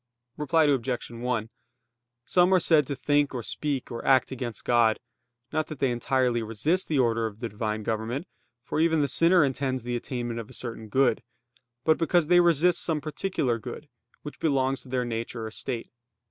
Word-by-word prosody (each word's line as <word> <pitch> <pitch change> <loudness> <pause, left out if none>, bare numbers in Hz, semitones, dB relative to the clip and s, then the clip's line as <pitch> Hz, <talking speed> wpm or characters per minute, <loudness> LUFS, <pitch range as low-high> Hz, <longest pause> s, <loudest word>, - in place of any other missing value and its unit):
Reply 150 +2 +2
Obj. 130 -5 0
1: 115 -1 -2 0.8
Some 180 +1 +3
are - - +5
said 155 -5 +3
to 140 - -3
think 145 +2 +1
or 120 - -3
speak, 140 +1 -3
or 115 - -5
act 130 -1 +3
against 120 -4 -5
God: 115 -2 +3 0.5
not 155 0 0
that 155 - -7
they 130 -1 +1
entirely 120 0 +1
resist 115 - 0
the 155 - 0
order 115 -3 +2
of 105 -1 -10
the 115 -1 -4
Divine 110 0 -3
government; 115 - -3 0.4
for - - -3
even 160 -2 +3
the - - +1
sinner 165 +3 +4
intends 130 -2 -2
the 120 0 -3
attainment 120 -1 -4
of 115 - -8
a - - -13
certain 115 -3 -6
good: 130 +1 +2 0.6
but 160 +1 +3
because 170 0 +2
they 175 +3 +5
resist 175 0 +3
some 160 -3 0
particular 145 -5 -2
good, 130 +6 -8 0.3
which 150 - -8
belongs 135 -3 +1
to 130 - -15
their 125 -1 -1
nature 115 0 -4
or 110 - -6
state. 120 +1 -4
130 Hz, 185 wpm, -27 LUFS, 115-150 Hz, 0.8 s, are